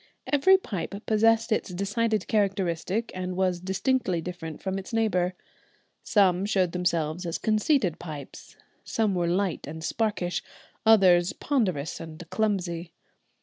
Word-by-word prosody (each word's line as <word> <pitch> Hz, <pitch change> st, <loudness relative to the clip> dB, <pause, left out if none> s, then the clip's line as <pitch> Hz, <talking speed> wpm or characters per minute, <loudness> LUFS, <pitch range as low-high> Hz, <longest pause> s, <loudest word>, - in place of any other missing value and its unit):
Every 340 Hz, +7 st, +5 dB
pipe 200 Hz, -, -5 dB
possessed 225 Hz, +1 st, +3 dB
its 215 Hz, -, 0 dB
decided 210 Hz, +4 st, -1 dB
characteristic 195 Hz, 0 st, 0 dB
and 185 Hz, 0 st, -4 dB
was 185 Hz, -2 st, +1 dB
distinctly 190 Hz, +1 st, 0 dB
different 165 Hz, -2 st, -6 dB
from 190 Hz, 0 st, -3 dB
its 190 Hz, -, -9 dB
neighbour. 185 Hz, -6 st, +1 dB, 0.7 s
Some 190 Hz, -3 st, +3 dB
showed 190 Hz, -4 st, +2 dB
themselves 170 Hz, -2 st, -1 dB
as 170 Hz, -2 st, -2 dB
conceited 215 Hz, -, +1 dB
pipes; 150 Hz, -5 st, -9 dB, 0.3 s
some 220 Hz, -3 st, 0 dB
were 175 Hz, -2 st, 0 dB
light 180 Hz, -2 st, -1 dB
and 160 Hz, +2 st, -7 dB
sparkish, 200 Hz, -4 st, -1 dB, 0.5 s
others 185 Hz, -5 st, +6 dB
ponderous 185 Hz, -, -1 dB
and 165 Hz, +1 st, -9 dB
clumsy. 180 Hz, -6 st, -1 dB
185 Hz, 125 wpm, -27 LUFS, 175-215 Hz, 0.7 s, others